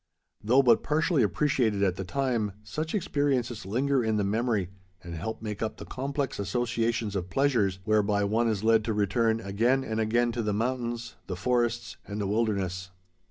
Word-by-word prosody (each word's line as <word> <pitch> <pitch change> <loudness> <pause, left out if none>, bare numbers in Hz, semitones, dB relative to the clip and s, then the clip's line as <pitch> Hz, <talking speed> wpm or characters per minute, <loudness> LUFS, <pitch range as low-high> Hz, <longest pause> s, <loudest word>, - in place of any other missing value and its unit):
Though 125 +6 +4
but 120 -3 +5
partially 155 0 +1
appreciated 110 - +1
at 95 -2 +2
the 95 - -4
time, 115 -2 -1
such 155 - -4
experiences 135 - 0
linger 130 +5 +1
in 110 -1 +1
the 105 - +1
memory 105 -2 0 0.3
and 85 0 -7
help 110 +7 -5
make 105 -2 -4
up 110 - -2
the - - -8
complex 140 0 -3
associations 115 0 -1
of 90 -1 -3
pleasures 110 -5 +2
whereby 105 -1 +2
one 110 +4 +1
is 110 -2 -1
led 110 -1 +4
to 115 - 0
return 110 +2 +1
again 115 +7 +1
and 110 -2 -3
again 120 +2 +2
to 120 0 -2
the 105 -2 -1
mountains, 120 +1 -2
the 90 - -3
forests, 120 +3 0
and 100 +1 -5
the 105 - -1
wilderness. 95 -3 -1
115 Hz, 175 wpm, -28 LUFS, 100-125 Hz, 0.3 s, but